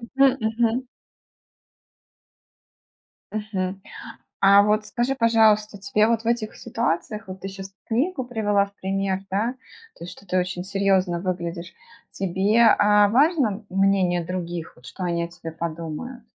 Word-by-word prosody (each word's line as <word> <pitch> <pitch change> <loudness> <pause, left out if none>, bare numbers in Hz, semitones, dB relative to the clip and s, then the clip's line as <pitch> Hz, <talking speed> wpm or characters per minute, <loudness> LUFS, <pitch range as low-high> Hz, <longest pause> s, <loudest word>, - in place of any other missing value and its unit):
Мгм. 270 -1 +6
Мгм. 235 +3 0 2.4
Мгм. 195 -3 -3 0.6
А 200 +1 +7
вот, 215 +1 +1
скажи, 240 +5 -1
пожалуйста, 220 -3 +3
тебе 210 +2 +1
вот 230 -1 0
в - - -23
этих 235 -2 -1
ситуациях, 215 -1 -2
вот 185 0 -8
ты 195 - -5
щас 195 0 -8 0.2
книгу 260 +4 -1
привела 205 -4 +1
в 200 - -18
пример, 195 0 -2
да, 215 +6 0 0.4
то - - -11
есть, 175 - -7
что 200 - -15
ты 185 0 -1
очень 180 0 -3
серьезно 190 -3 +1
выглядишь, 175 -2 -4 0.4
тебе, 195 +4 +1
а, 210 -1 +5
важно 255 - +2
мнение 190 -2 +2
других, 175 -2 -5
вот 125 - -19
что 185 - -7
они 170 -1 -1
о - - -3
тебе 170 -1 -9
подумают? 165 +9 -6
200 Hz, 140 wpm, -23 LUFS, 185-225 Hz, 2.4 s, А